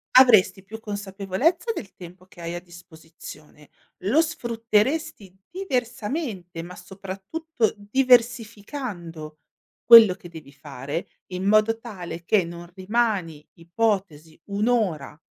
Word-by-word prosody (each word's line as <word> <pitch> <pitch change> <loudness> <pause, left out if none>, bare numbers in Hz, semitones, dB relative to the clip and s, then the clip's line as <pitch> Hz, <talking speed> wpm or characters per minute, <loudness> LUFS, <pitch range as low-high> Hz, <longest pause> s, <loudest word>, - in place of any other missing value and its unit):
Avresti 215 -7 +6
più 220 +3 -9
consapevolezza 205 - -1
del 200 - -7
tempo 180 +1 -13
che 190 -1 -16
hai 170 +1 -4
a - - -4
disposizione. 160 -4 -14 0.3
Lo 205 +12 +2
sfrutteresti 230 - -1 0.2
diversamente, 240 - -4
ma 180 +1 -10
soprattutto 195 - -4
diversificando, 215 - 0 0.5
quello 225 -5 +10
che 190 -2 -13
devi 160 -4 -12
fare 140 +2 -6 0.2
in 185 0 -5
modo 215 +2 +3
tale 180 -7 -8
che 195 0 +3
non 170 0 -9
rimani, 190 -6 -1
ipotesi, 170 -3 -2
un'ora 200 - -1
195 Hz, 105 wpm, -24 LUFS, 170-230 Hz, 0.5 s, quello